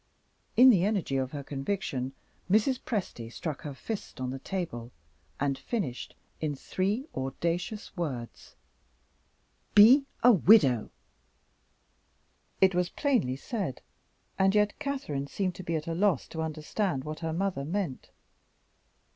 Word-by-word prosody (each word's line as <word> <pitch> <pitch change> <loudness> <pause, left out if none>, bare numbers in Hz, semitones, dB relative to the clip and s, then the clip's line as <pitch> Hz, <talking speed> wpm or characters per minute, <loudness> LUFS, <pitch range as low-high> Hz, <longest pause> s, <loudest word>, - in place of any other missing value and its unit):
In 255 +2 +9
the 185 -6 +3
energy 195 -9 0
of 130 0 -1
her 145 -2 -5
conviction, 135 -3 -3 0.4
Mrs. 220 +6 +3
Presty 150 - -4
struck 150 +2 -5
her 145 -2 -6
fist 215 +1 -6
on 130 0 -2
the 135 - -5
table, 135 -9 -4 0.5
and 140 -1 0
finished 140 - -4 0.2
in 150 -2 -2
three 200 - -1
audacious 170 - -3
words: 135 -10 -5 1.2
"Be 250 +7 +8 0.2
a 245 - +9
Widow!" 160 - +5 1.7
It 190 -1 +6
was 180 0 +1
plainly 245 - +1
said 180 - -4 0.6
and 190 +1 +4
yet 210 0 +2
Catherine 265 - -3
seemed 185 +3 -2
to 185 - -9
be 170 -1 -2
at 155 -1 -2
a 165 - -2
loss 195 +2 +1
to 160 - -4
understand 160 0 -2
what 155 +1 -6
her 165 -1 -3
mother 180 -3 -1
meant. 170 -3 -3
170 Hz, 130 wpm, -29 LUFS, 135-205 Hz, 1.7 s, In